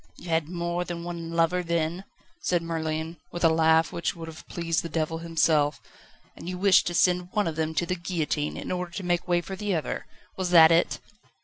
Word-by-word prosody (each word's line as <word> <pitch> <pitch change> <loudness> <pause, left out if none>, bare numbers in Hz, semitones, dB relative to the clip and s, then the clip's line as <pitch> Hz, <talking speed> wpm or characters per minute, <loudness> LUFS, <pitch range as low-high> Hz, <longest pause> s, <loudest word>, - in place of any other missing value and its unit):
"You 175 - -10
had 160 -1 +1
more 170 0 -2
than 175 -1 -6
one 170 -1 -5
lover, 165 +2 +2
then?" 170 +2 -1 0.3
said 175 -2 0
Merlin, 160 0 -3
with 175 - -5
a 165 - +7
laugh 160 0 +3
which 170 - -2
would 165 -1 -8
have 160 -1 -11
pleased 165 -1 -1
the 165 - -6
devil 165 +1 -2
himself. 160 -3 +2 0.6
"And 175 - -8
you 180 - -4
wished 190 0 +5
to 175 - -2
send 180 +1 +2
one 210 -2 +2
of 165 - -2
them 160 0 -2
to 175 - +1
the 180 - -1
guillotine 165 -4 -2
in - - -5
order 180 -1 -2
to 195 - -5
make 175 -1 0
way 175 -1 +2
for 190 +2 -6
the 205 -1 -1
other? 160 - -3 0.3
Was 185 -2 -1
that 165 -2 +8
it?" 165 +1 +2
170 Hz, 215 wpm, -26 LUFS, 160-180 Hz, 0.6 s, that